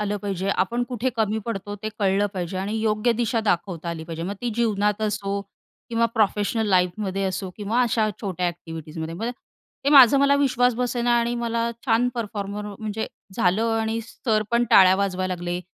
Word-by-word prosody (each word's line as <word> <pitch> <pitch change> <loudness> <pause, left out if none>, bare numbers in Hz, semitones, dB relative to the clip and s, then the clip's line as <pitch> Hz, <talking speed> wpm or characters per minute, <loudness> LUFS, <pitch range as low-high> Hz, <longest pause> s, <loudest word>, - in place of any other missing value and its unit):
आलं 205 0 -1
पाहिजे. 195 -1 -3
आपण 215 +5 0
कुठे 250 +1 -1
कमी 220 -1 +1
पडतो? 205 -2 -4
ते 215 - -2
कळलं 200 0 +2
पाहिजे 180 0 -3
आणि 205 +3 -2
योग्य 220 +2 +2
दिशा 230 0 0
दाखवता 175 -3 -1
आली 165 -1 -4
पाहिजे. 165 0 -6
मग 190 +4 -3
ती 245 - -2
जीवनात 210 -2 +1
असो 200 -1 -1 0.5
किंवा 230 0 +2
प्रोफेशनल 215 0 +1
लाईफमध्ये 190 +1 +1
असो 190 0 -3
किंवा 215 +4 0
अशा 225 -2 +1
छोट्या 185 -4 -2
अ‍ॅक्टिव्हिटीजमध्ये, 165 -1 -6
मग 205 +7 -5
ते - - -1 0.5
ते - - +2
माझं 275 -2 +8
मला 280 0 +4
विश्वास 250 -3 +2
बसेना 245 0 0
आणि 235 +1 0
मला 235 -1 -1 0.2
छान 240 +1 +3
परफॉर्मर 210 -3 -4
म्हणजे 220 0 -3 0.3
झालं 185 +4 +2 0.2
आणि 225 +1 -1
सर 220 -1 -1
पण 235 0 +3
टाळ्या 185 -1 +7
वाजवायला 185 -2 -1
लागले, 175 0 -4
210 Hz, 175 wpm, -24 LUFS, 190-230 Hz, 0.5 s, माझं